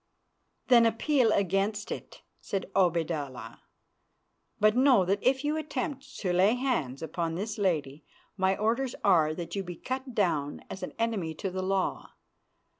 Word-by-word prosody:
"Then 235 -2 +6
appeal 235 +1 +2
against 200 +3 0
it," - - -7 0.2
said 195 -1 -4
Obaidallah, 165 -7 -1 1.0
"but 215 +1 +4
know 255 -6 +5
that 200 +3 0
if 265 +2 +2
you 300 +1 0
attempt 300 -2 -4
to 180 -3 0
lay 195 +6 +4
hands 165 - -1
upon 165 +1 -3
this 210 +4 -4
lady, 155 -7 -1 0.3
my 190 0 +1
orders 235 +4 0
are 160 -5 +4
that 170 +2 -6
you 195 - -2
be 175 -1 -7
cut 260 +4 -5
down 150 -8 0
as 190 - -7
an - - -5
enemy 205 -9 -1
to 190 +4 -4
the 185 +1 -3
law. 190 0 -1
195 Hz, 150 wpm, -29 LUFS, 170-235 Hz, 1.0 s, Then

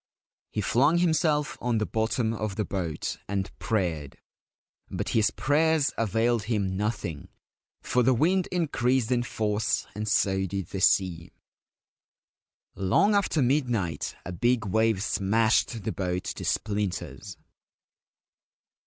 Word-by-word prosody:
He 105 - -2
flung 140 - +3
himself 160 -3 +1
on 120 -1 0
the 110 - 0
bottom 110 +1 0
of 110 -3 -3
the 105 - -1
boat 90 -5 -3
and 100 -1 -2
prayed; 85 - -2 0.7
but 95 +2 -3
his 110 -2 +3
prayers 150 +2 +2
availed 115 +1 +1
him 100 -5 -1
nothing, 100 -7 -3 0.6
for 125 - +1
the 130 +1 +3
wind 180 +8 +2
increased 130 -8 +1
in 125 -1 +2
force, 110 -2 -1
and 105 +2 -4
so 95 -2 +2
did 95 -1 -4
the 95 - -4
sea. 90 -4 +2 1.4
Long 170 - +2
after 195 -7 +2
midnight 120 - 0
a 90 - -5
big 120 +5 +1
wave 110 0 +1
smashed 110 +2 +1
the - - -2
boat 90 -1 -2
to - - -5
splinters. 100 -3 -3
110 Hz, 125 wpm, -27 LUFS, 95-125 Hz, 1.4 s, flung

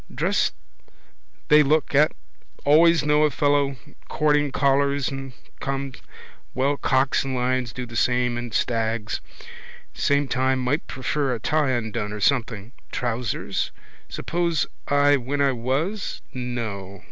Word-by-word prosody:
Dress - - +1 1.0
they 150 0 +8
look 150 +1 +2
at. 150 +2 +5 0.5
Always 160 +1 +5
know 150 0 +3
a 155 - +4
fellow 145 -1 +1 0.3
courting: 150 -2 +2
collars 140 0 +2
and 135 -1 -6 0.3
cuffs. 135 -1 -4 0.5
Well 135 +3 +2
cocks 135 0 +2
and 135 -1 -3
lions 125 -1 0
do 125 +2 -5
the 120 -1 -11
same 125 +1 +1
and 120 -1 -5
stags. 115 -1 -1 0.7
Same 140 0 +1
time 130 +1 +1
might 130 +5 -1
prefer 135 0 -1
a - - -6
tie 150 +4 +1
undone 110 -3 -2
or 105 - -5
something. 115 -2 0 0.2
Trousers? 120 -3 -2 0.4
Suppose 170 -2 -1 0.2
I 145 0 +4
when 135 +3 -3
I 140 -1 +3
was? 135 - -2
No. 110 -6 -5
135 Hz, 130 wpm, -24 LUFS, 120-145 Hz, 1.0 s, they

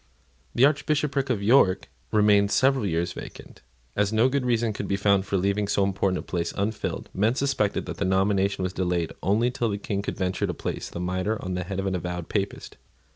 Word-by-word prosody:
The 125 - +6
Archbishopric 140 -1 +1
of 110 -5 0
York 105 -4 +4 0.2
remained 105 -1 +4
several 130 -1 +2
years 85 0 -1
vacant. - - -10 0.3
As 105 0 +1
no 110 +4 +3
good 135 -1 -1
reason 115 -2 +1
could - - -4
be 100 - 0
found 100 -1 +2
for 100 - 0
leaving 100 +2 0
so 100 0 +2
important 95 -1 0
a - - -3
place 85 -2 -2
unfilled, 105 +2 -2
men 110 +5 +2
suspected 135 -7 0
that - - -6
the 100 - -1
nomination 95 0 +1
was 90 0 -2
delayed 90 -3 -1
only 110 +6 +2
till 120 -2 -1
the 100 - -2
King 100 -1 -3
could - - -4
venture 95 +1 -1
to 90 - -3
place - - -4
the - - -7
mitre 95 +4 -1
on 90 - -2
the 90 0 -3
head 95 +1 -4
of 95 - -2
an 95 - 0
avowed 90 -1 -4
Papist. 100 -2 -3
100 Hz, 210 wpm, -25 LUFS, 95-110 Hz, 0.3 s, The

